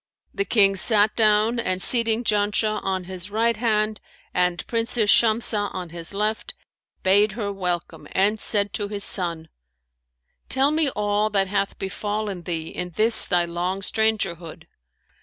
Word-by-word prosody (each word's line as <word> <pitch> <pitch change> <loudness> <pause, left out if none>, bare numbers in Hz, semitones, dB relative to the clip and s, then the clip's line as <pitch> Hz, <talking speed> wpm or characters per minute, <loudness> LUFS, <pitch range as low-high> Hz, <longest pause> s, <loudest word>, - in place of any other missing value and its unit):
The 395 - -1
King 200 - +3
sat 210 +1 +3
down 215 +1 +2
and 185 -5 -2
seating 230 +3 +2
Janshah 210 0 0
on 190 -1 -2
his 185 +1 -7
right 230 +2 0
hand 215 -1 -1 0.3
and 180 -1 0
Princess 230 -2 +1
Shamsah 220 -2 +3
on 180 -2 -6
his 165 0 -3
left, 210 +2 -3 0.5
bade 200 +2 +3
her 205 -2 -4
welcome 180 -3 -4
and 205 +3 +1
said 205 -2 +2
to 205 - -2
his 200 -1 -4
son, 170 -5 +2 1.0
'Tell 270 +2 +2
me 310 -2 +2
all 210 -2 -1
that 195 -2 0
hath 200 0 -2
befallen 205 0 -4
thee 165 -2 -4
in 180 0 -6
this 220 +2 +4
thy 175 -2 +1
long 175 +3 -4
strangerhood.' 200 -7 -1
205 Hz, 145 wpm, -22 LUFS, 185-220 Hz, 1.0 s, this